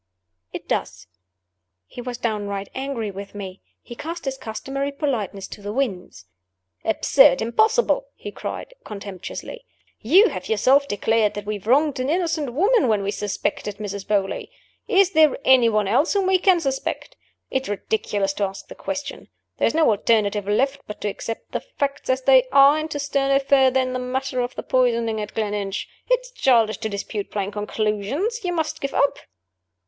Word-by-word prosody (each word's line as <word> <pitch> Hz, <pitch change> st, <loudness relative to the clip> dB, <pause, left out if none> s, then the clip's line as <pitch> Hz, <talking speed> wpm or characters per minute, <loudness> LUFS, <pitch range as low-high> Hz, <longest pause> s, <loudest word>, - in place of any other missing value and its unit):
"It -, -, -8 dB
does." -, -, -3 dB, 0.8 s
He 245 Hz, -, -9 dB
was 245 Hz, -1 st, -5 dB
downright 205 Hz, -4 st, -3 dB
angry 260 Hz, -6 st, -3 dB
with 200 Hz, +1 st, -9 dB
me. 195 Hz, -2 st, -7 dB, 0.2 s
He 240 Hz, -, -9 dB
cast 330 Hz, +7 st, -6 dB
his 270 Hz, -1 st, -2 dB
customary 270 Hz, +3 st, -4 dB
politeness 240 Hz, -, -3 dB
to -, -, -10 dB
the 205 Hz, 0 st, -5 dB
winds. 190 Hz, -, -3 dB, 0.6 s
"Absurd! 220 Hz, -3 st, +4 dB
impossible!" 450 Hz, -, +2 dB
he -, -, -8 dB
cried, -, -, -6 dB
contemptuously. 205 Hz, -, -7 dB, 0.4 s
"You 365 Hz, -, +5 dB
have -, -, -6 dB
yourself 265 Hz, +6 st, +4 dB
declared 215 Hz, 0 st, +1 dB
that 205 Hz, -1 st, -5 dB
we 210 Hz, 0 st, -3 dB
wronged 275 Hz, +7 st, +2 dB
an 255 Hz, +2 st, -1 dB
innocent 325 Hz, -5 st, 0 dB
woman 400 Hz, -, +3 dB
when 210 Hz, -3 st, +1 dB
we 200 Hz, -, -1 dB
suspected 205 Hz, 0 st, -3 dB
Mrs. 200 Hz, -2 st, -6 dB
Beauly. 200 Hz, -2 st, -1 dB, 0.4 s
Is 390 Hz, -4 st, +4 dB
there 315 Hz, -5 st, +4 dB
any 255 Hz, -3 st, +6 dB
one 215 Hz, -2 st, +1 dB
else 250 Hz, -, +2 dB
whom 400 Hz, -2 st, +1 dB
we 375 Hz, 0 st, +3 dB
can 370 Hz, -2 st, +4 dB
suspect? 270 Hz, -4 st, -3 dB, 0.4 s
It 265 Hz, 0 st, -1 dB
is -, -, -7 dB
ridiculous 205 Hz, -1 st, -1 dB
to 205 Hz, -, -2 dB
ask 195 Hz, 0 st, -8 dB
the -, -, -8 dB
question. 290 Hz, 0 st, -6 dB, 0.3 s
There -, -, +4 dB
is -, -, -1 dB
no 320 Hz, -1 st, +4 dB
alternative 210 Hz, -1 st, +1 dB
left 270 Hz, +7 st, +1 dB
but 210 Hz, -, -7 dB
to 210 Hz, -, -1 dB
accept 225 Hz, +3 st, -6 dB
the -, -, -2 dB
facts 285 Hz, -, -4 dB
as 260 Hz, 0 st, +1 dB
they 260 Hz, -1 st, +5 dB
are, 280 Hz, +2 st, +6 dB
and 310 Hz, +1 st, -4 dB
to 295 Hz, -, -3 dB
stir 280 Hz, -1 st, 0 dB
no 275 Hz, 0 st, +4 dB
further 265 Hz, -1 st, +3 dB
in 255 Hz, 0 st, -1 dB
the 255 Hz, -, -2 dB
matter 255 Hz, +1 st, -2 dB
of 245 Hz, +1 st, -4 dB
the -, -, -5 dB
poisoning 230 Hz, -3 st, +1 dB
at 210 Hz, 0 st, -7 dB
Gleninch. 205 Hz, -2 st, -2 dB, 0.2 s
It -, -, +3 dB
is -, -, -14 dB
childish 230 Hz, -, +2 dB
to 220 Hz, -1 st, -3 dB
dispute 200 Hz, 0 st, -4 dB
plain 200 Hz, -1 st, -3 dB
conclusions. 215 Hz, -, -2 dB
You 360 Hz, -, -1 dB
must 320 Hz, -2 st, -2 dB
give 275 Hz, -, -3 dB
up." 280 Hz, -, +2 dB
250 Hz, 180 wpm, -23 LUFS, 210-285 Hz, 0.8 s, any